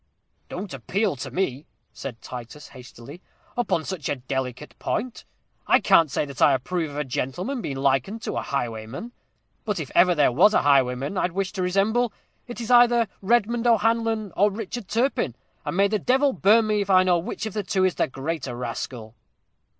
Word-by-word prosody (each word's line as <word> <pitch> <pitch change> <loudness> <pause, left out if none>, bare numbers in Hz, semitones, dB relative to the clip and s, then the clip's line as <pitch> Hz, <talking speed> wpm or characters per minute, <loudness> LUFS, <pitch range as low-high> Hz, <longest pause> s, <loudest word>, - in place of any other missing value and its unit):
"Don't 185 -2 -6
appeal 185 - -1
to 130 - -5
me," 155 -6 -2 0.3
said 120 -4 -8
Titus, 125 +4 -9
hastily, 130 +4 -12 0.3
"upon 210 -9 0
such 180 -7 -4
a - - 0
delicate 130 +1 -5
point. 250 -1 -3 0.4
I - - +5
can't 165 -2 +4
say 140 - -1
that 140 -3 -9
I 145 - +6
approve 160 +5 -2
of 145 - -8
a 150 - 0
gentleman 175 - -3
being 135 -8 -4
likened 135 - 0
to - - -3
a - - -1
highwayman. 120 - -4 0.5
But - - -2
if - - -6
ever 180 -1 +5
there 145 -4 +4
was 190 - +5
a - - +3
highwayman 135 +4 +2
I'd 180 - -1
wish 195 +1 -2
to 195 - -4
resemble, 205 +6 +1 0.4
it's 240 -1 -5
either 240 -2 +5
Redmond 235 +3 +1
O'Hanlon 225 -2 +1
or 205 +2 +4
Richard 215 +1 -6
Turpin; 230 - 0 0.3
and 150 +3 -4
may 200 0 +5
the 215 +1 -1
devil 265 +6 +2
burn 220 +2 +4
me 210 -1 +1
if 200 - -4
I 185 -1 +6
know 180 -2 +3
which 170 - -5
of 220 - -5
the 210 - -1
two 190 -1 0
is 185 - +2
the - - 0
greater 135 -1 -4
rascal!" 120 -2 -6
180 Hz, 185 wpm, -24 LUFS, 135-220 Hz, 0.5 s, I